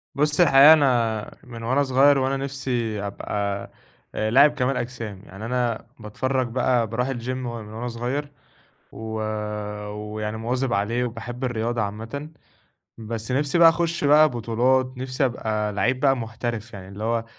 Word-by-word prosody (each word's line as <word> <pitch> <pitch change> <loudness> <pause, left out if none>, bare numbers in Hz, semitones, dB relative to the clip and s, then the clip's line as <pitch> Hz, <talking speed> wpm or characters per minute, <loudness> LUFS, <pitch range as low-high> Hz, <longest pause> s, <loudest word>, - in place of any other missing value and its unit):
بُص 150 +3 +1
الحقيقة 145 -1 +8
أنا 120 -7 +1
من 115 -2 -9
وأنا 130 +5 +2
صغير 135 +2 +4
وأنا 135 +1 0
نفسي 125 -6 -3
أبقى 100 0 -3 0.4
لاعب 130 +8 +4
كمال 135 -2 -1
أجسام، 115 -5 -5
يعني 100 +4 -9
أنا 120 -2 -1
باتفرج 130 +4 -2
بقى 120 -1 +1
بارُوح 125 +4 -1
الGym 120 -1 -4
من 130 -1 -3
وأنا 115 0 -6
صغير، 125 +5 -3 0.6
و 110 0 -6 0.8
ويعني 105 +1 -5
مواظب 125 +2 -1
عليه 115 +5 0
وباحب 120 +2 -6
الرياضة 120 -1 -1
عامةً. 115 +9 -5 0.7
بس 115 +2 -5
نِفسي 145 +4 +1
بقى 165 -1 +9
أخش 170 -1 0
بقى 150 +2 +6
بطولات، 125 +3 +1
نِفسي 130 +1 -1
أبقى 110 -4 -1
لعيب 125 +5 0
بقى 135 -1 +3
محترف 115 0 -5
يعني 95 -1 -9
اللي 100 +3 -7
هو، 115 0 0
120 Hz, 145 wpm, -24 LUFS, 110-135 Hz, 0.8 s, بقى